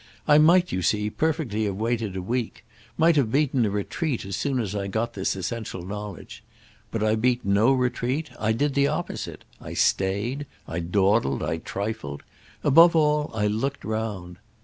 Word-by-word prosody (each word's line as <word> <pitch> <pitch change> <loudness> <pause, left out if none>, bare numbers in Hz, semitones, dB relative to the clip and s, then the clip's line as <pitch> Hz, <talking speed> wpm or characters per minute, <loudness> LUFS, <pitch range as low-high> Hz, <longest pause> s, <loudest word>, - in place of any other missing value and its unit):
I 150 0 +7
might, 175 +4 +5
you 95 - -1
see, 105 +4 +1
perfectly 145 -9 -1
have 100 -2 -2
waited 110 -2 -2
a 95 - -4
week; 120 +3 -3 0.3
might 165 +1 +4
have 125 -6 +2
beaten 135 -4 +2
a - - 0
retreat 115 - -2
as 95 - -4
soon 140 -3 -1
as 105 -4 -2
I 100 -1 -2
got 110 +4 -2
this 95 0 -1
essential 95 -2 -5
knowledge. 105 0 -7 0.5
But 110 -2 -2
I 110 0 +3
beat 120 +2 +1
no 100 +6 +4
retreat; 130 +3 -1
I 110 +1 +1
did 140 +5 0
the 140 0 +3
opposite; - - -4 0.2
I - - -7
stayed, 105 +9 0 0.2
I 80 - -3
dawdled, 95 - +1
I 80 - -1
trifled; 100 -6 -5 0.4
above 165 +4 +7
all 150 -1 +2
I 105 -1 0
looked 115 +7 -2
round. 105 -5 -4
110 Hz, 170 wpm, -25 LUFS, 100-140 Hz, 0.5 s, I